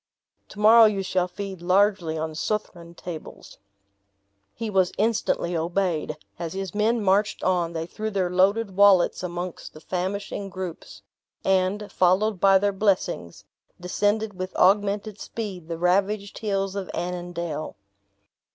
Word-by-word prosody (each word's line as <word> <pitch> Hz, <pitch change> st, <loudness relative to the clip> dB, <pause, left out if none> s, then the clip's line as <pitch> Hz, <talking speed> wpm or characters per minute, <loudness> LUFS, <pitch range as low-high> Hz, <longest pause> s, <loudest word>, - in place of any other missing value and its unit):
To -, -, -13 dB
morrow 225 Hz, +2 st, +8 dB
you 205 Hz, -3 st, +1 dB
shall 185 Hz, -1 st, 0 dB
feed 190 Hz, 0 st, -7 dB
largely 185 Hz, -2 st, +2 dB
on 160 Hz, 0 st, -3 dB
Southron 170 Hz, -2 st, -4 dB
tables." 170 Hz, -3 st, -9 dB, 1.0 s
He 230 Hz, -, -4 dB
was 190 Hz, -3 st, +2 dB
instantly 210 Hz, -5 st, 0 dB
obeyed. 170 Hz, -2 st, -1 dB, 0.2 s
As 170 Hz, -2 st, -4 dB
his 195 Hz, -2 st, -4 dB
men 220 Hz, +2 st, +1 dB
marched 200 Hz, +2 st, +1 dB
on, 175 Hz, -2 st, +1 dB
they 160 Hz, 0 st, -3 dB
threw 215 Hz, +5 st, -4 dB
their 190 Hz, -4 st, -1 dB
loaded 195 Hz, +2 st, +2 dB
wallets 200 Hz, -3 st, +5 dB
amongst 175 Hz, 0 st, -5 dB
the -, -, -10 dB
famishing 195 Hz, +4 st, -4 dB
groups; 185 Hz, -2 st, -7 dB, 0.4 s
and, 190 Hz, +2 st, +1 dB
followed 190 Hz, +3 st, +2 dB
by 195 Hz, +1 st, +6 dB
their 200 Hz, +1 st, +1 dB
blessings, 190 Hz, -, -1 dB, 0.3 s
descended 205 Hz, +4 st, 0 dB
with 185 Hz, 0 st, -6 dB
augmented 205 Hz, +1 st, +2 dB
speed 195 Hz, -7 st, -6 dB
the 165 Hz, -1 st, -4 dB
ravaged 195 Hz, +4 st, 0 dB
hills 195 Hz, -3 st, -1 dB
of 195 Hz, -2 st, -4 dB
Annandale. 175 Hz, -3 st, -4 dB
190 Hz, 135 wpm, -25 LUFS, 175-205 Hz, 1.0 s, morrow